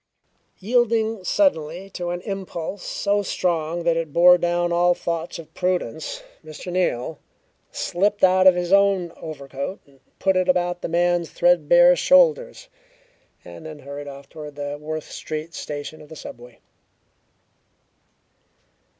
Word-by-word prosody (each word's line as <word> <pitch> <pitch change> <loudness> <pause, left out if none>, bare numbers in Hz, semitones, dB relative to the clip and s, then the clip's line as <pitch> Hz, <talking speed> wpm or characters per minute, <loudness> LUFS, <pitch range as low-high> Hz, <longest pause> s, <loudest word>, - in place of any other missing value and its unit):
Yielding 225 -1 +1
suddenly 180 - 0
to 180 -2 -5
an 175 0 -3
impulse 190 -2 -5
so 205 +3 -1
strong 170 -3 -1
that 170 -1 +2
it 165 -2 -3
bore 180 +3 +7
down 175 0 0
all 175 +1 +3
thoughts 170 -1 -4
of 165 -2 -12
prudence, 180 -6 -2 0.2
Mr. 155 +3 -8
Neal 160 -5 -1 0.5
slipped 205 +3 -1
out 185 0 +6
of 185 - +7
his 180 +1 -1
own 195 -3 +3
overcoat 140 +2 -6
and 140 -1 -24 0.2
put 190 -1 +1
it 185 0 +1
about 175 -1 +1
the - - -4
man's 175 0 +1
threadbare - - +5
shoulders, - - +3 0.8
and 160 - -10
then 155 -1 -9
hurried 145 0 -8
off 140 0 -10
toward 150 -2 -10
the 145 0 -5
Worth 155 0 -6
Street 155 +2 -6
Station 150 -1 -6
of 150 - -15
the 160 - -10
subway. 120 -4 -11
175 Hz, 135 wpm, -23 LUFS, 155-190 Hz, 0.8 s, bore